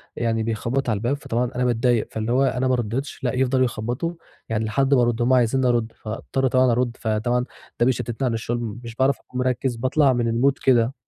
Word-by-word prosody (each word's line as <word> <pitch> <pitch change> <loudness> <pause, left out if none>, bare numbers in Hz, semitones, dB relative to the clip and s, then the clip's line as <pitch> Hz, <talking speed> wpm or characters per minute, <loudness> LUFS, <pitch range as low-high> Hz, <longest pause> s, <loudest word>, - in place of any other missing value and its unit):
يعني، 115 -1 0
بيخبط 115 +4 -1
على 110 - +1
الباب، 120 +6 -1
فطبعًا 120 -2 -2
أنا 125 0 0
باتضايق، 120 -1 +1
فاللي 110 +1 -3
هو 130 +2 +3
أنا 130 -1 +1
ما 130 - +3
رَدِّتش، 120 +5 -4
لأ 125 - 0
يفضَلوا 130 0 +2
يخبّطوا 120 +8 -3 0.4
يعني 110 0 -1
لحد 135 +5 +1
ما 130 - +5
أرد، 120 0 +1
هُم 125 +2 +3
عايزينّي 125 +1 +3
أرد، 120 -2 +1
فأضطَر 115 +4 -2
طبعًا 130 0 +3
أرد، 120 0 0
فطبعًا 120 +3 0 0.3
ده 120 - +4
بيشتِّتني 125 0 -1
عن 120 - 0
الشغل، 115 0 -3
مش 115 -1 -8
باعرف 130 +2 +2
أكون 125 - -8
مركِّز، 125 0 0
باطلَع 130 +3 +2
من 120 -1 0
الmood 130 +5 +3
كده. 120 -1 +3
120 Hz, 205 wpm, -23 LUFS, 115-130 Hz, 0.4 s, ما